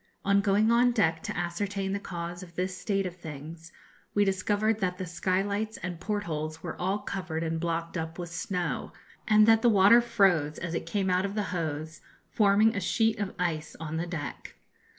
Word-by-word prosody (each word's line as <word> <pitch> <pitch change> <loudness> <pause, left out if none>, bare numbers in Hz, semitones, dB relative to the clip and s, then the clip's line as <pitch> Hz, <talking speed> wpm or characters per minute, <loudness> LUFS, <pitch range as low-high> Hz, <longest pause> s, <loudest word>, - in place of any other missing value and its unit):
On 200 0 +4
going 205 +3 +3
on 245 +1 +4
deck 165 -8 +2
to - - -5
ascertain 195 +3 -2
the 200 - -1
cause 175 -2 -6
of 170 -2 -12
this 185 +1 -2
state 195 -1 -1
of 180 -1 -5
things, 160 +1 -9 0.4
we 205 0 +4
discovered 205 +3 +1
that 180 -2 -1
the 185 - -4
sky 185 +2 0
lights 205 +2 -2
and 180 -2 -4
portholes 160 -7 -3
were 170 - -4
all 190 +3 +1
covered 185 -5 -4
and 165 0 -1
blocked 170 0 -2
up 160 -1 -4
with 175 -2 -6
snow, 180 +1 -3 0.3
and 215 -1 +6
that 225 0 +6
the 240 - +5
water 205 +3 +7
froze 195 -10 +2
as 170 -1 -4
it - - -3
came 195 -3 0
out 180 +1 +2
of 200 +1 -3
the 210 - 0
hose, 155 -2 -3 0.3
forming 215 +2 +4
a 200 - -1
sheet 225 +4 +1
of 200 -2 -3
ice 165 -3 -2
on 160 0 -4
the 170 +2 -2
deck. 160 -4 -6
185 Hz, 195 wpm, -28 LUFS, 165-205 Hz, 0.4 s, water